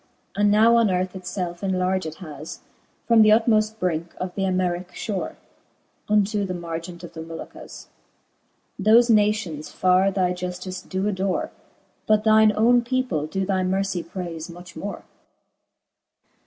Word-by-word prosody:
And 205 0 +3
now 225 +3 +5
on 230 -3 +4
earth 185 0 -1
itfelf 180 -2 -5
enlarged 185 -3 -1
has. 155 -4 -9 0.5
From 230 -1 +6
the 215 - +6
utmoft 220 0 +3
brinke 170 -2 -2
of 185 -1 -4
the 195 - -1
Armericke 180 -1 -1
Ihore, 200 -4 -4 0.7
Unto 210 0 +2
the 185 -2 -3
margent 170 +1 -6
of 175 - -9
the 160 - -7
Molucasf 165 0 -9 1.0
Thofe 230 +4 +5
nations 205 -8 +1
farre 185 +1 +3
thy 185 -2 0
juftice 180 +1 -5
doe 190 +1 -1
adore: 190 -2 -1 0.6
But 215 0 +3
thine 220 0 +6
owne 240 +3 +5
people 240 - -1
doe 190 +4 -2
thy 190 -1 0
mercy 190 0 -1
prayfe 170 -2 -6
much 175 +1 -12
more. 200 0 -6
185 Hz, 140 wpm, -23 LUFS, 175-210 Hz, 1.0 s, From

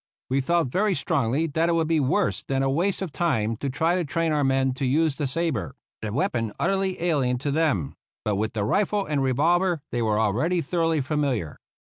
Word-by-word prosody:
We 135 +1 +2
felt 170 0 +1
very 200 +7 +1
strongly 140 -2 0
that 165 +2 0
it - - +2
would 165 -1 +1
be 165 -1 +2
worse 155 +9 +1
than 135 0 -1
a 135 - +1
waste 185 +7 0
of 180 - -5
time 115 -11 0
to 140 +4 -3
try 160 +6 +1
to 180 -1 +1
train 165 +2 -1
our 150 -1 +1
men 135 -1 +2
to 135 +1 -3
use 155 +3 +2
the 145 -1 -2
sabre 160 -4 -2
— - - -73
a 110 - -3
weapon 115 -3 -1
utterly 195 -1 0
alien 140 -8 +1
to 140 +3 -2
them; 140 - 0 0.3
but 105 - +1
with 110 +2 -2
the 105 -3 -1
rifle 200 - +1
and 145 -2 -1
revolver 165 +7 +2
they 120 - -1
were 110 -1 +1
already 125 - +1
thoroughly 165 -1 0
familiar. 135 - -2
145 Hz, 215 wpm, -25 LUFS, 125-170 Hz, 0.3 s, We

